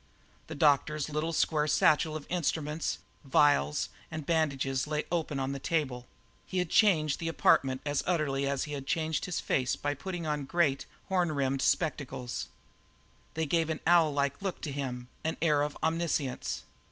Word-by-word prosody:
The 160 - -6
doctor's 150 0 +2
little 155 +2 -1
square 155 -2 +1
satchel 155 +1 +3
of 155 - -5
instruments, 160 -3 -1 0.3
vials, 135 - +3 0.2
and 155 -2 -6
bandages 140 -4 0
lay 150 0 -1
open 160 -5 -1
on 135 0 -1
the 140 - -4
table; 135 -6 -1 0.4
he 185 - -4
had 180 -2 0
changed 160 -9 +4
the 165 - -3
apartment 135 -5 +3
as 145 -1 0
utterly 145 -6 +1
as 140 -1 0
he 150 - -6
had 135 -1 -5
changed 160 -1 0
his 180 - -2
face 130 -1 0
by 145 0 -2
putting 175 +3 -5
on 150 -2 -1
great, 145 -2 +1 0.2
horn 180 -4 +2
rimmed 135 -2 0
spectacles. 140 -6 -1 0.9
They 160 0 0
gave 165 +1 +1
an 160 - -2
owl 165 -2 +5
like 140 +1 -1
look 195 -3 -3
to 150 - -4
him, 125 -3 -4 0.2
an 160 - -2
air 150 -3 +3
of 145 0 -2
omniscience. 160 -5 -1
150 Hz, 165 wpm, -30 LUFS, 140-160 Hz, 0.9 s, owl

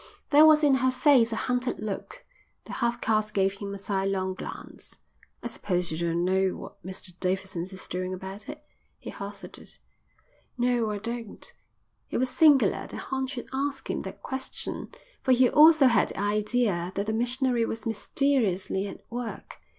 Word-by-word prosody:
There 300 +2 +8
was 310 0 +6
in 285 -2 +5
her 260 - +3
face 255 -2 +4
a - - -1
hunted 250 +2 -1
look. 215 - -6 0.4
The - - -10
half 235 -2 -1
caste 215 -1 0
gave 195 0 +1
him 200 -1 -5
a - - -6
sidelong 195 -1 -1
glance. - - -9 0.5
"I - - -2
suppose 180 -7 -2
you 160 - -3
don't 170 0 0
know 190 0 +1
what - - -11
Mr 185 0 -5
Davidson 190 -1 -2
is 190 0 -10
doing 185 +1 -3
about 190 +6 -7
it?" 300 0 -9 0.3
he - - -8
hazarded. - - -9 0.8
"No, 240 -2 +1
I 210 - -2
don't." 230 0 -6 0.6
It - - -2
was 255 0 0
singular 300 -5 +4
that - - -15
Horn 265 0 -3
should 255 -2 -6
ask 275 0 -2
him - - -2
that - - -9
question, 265 0 -5 0.3
for 260 - +3
he 250 0 +5
also 310 +1 +7
had 245 -2 +4
the - - -9
idea 205 -3 0
that 200 - -1
the 220 - -2
missionary 245 +1 +2
was 225 -1 -5
mysteriously 220 -5 0
at - - -9
work. 245 0 -6
225 Hz, 170 wpm, -27 LUFS, 190-260 Hz, 0.8 s, There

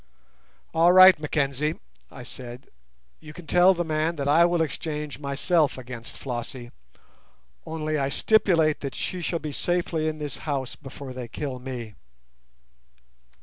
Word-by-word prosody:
"All 165 +2 +5
right, 185 -2 +9
Mackenzie," 150 0 -1 0.3
I 125 - -10
said, 125 +1 -9 0.5
"you 150 -1 -12
can 175 +1 -11
tell 180 +4 +5
the 175 0 -1
man 155 +1 0
that 140 -2 -3
I 160 +4 +6
will 175 -1 +2
exchange 150 -2 -5
myself 145 +1 +1
against 120 -2 -8
Flossie, 120 -1 -6 1.0
only 155 -1 -2
I 135 0 0
stipulate 165 -3 +3
that 140 -2 -5
she 180 - -3
shall 170 +1 -1
be 155 -2 -5
safely 170 0 -1
in 155 0 -2
this 150 -3 -6
house 135 -3 -2
before 135 -2 -9
they 125 -2 -6
kill 135 0 -5
me." 125 -4 -7
150 Hz, 145 wpm, -25 LUFS, 135-165 Hz, 1.0 s, right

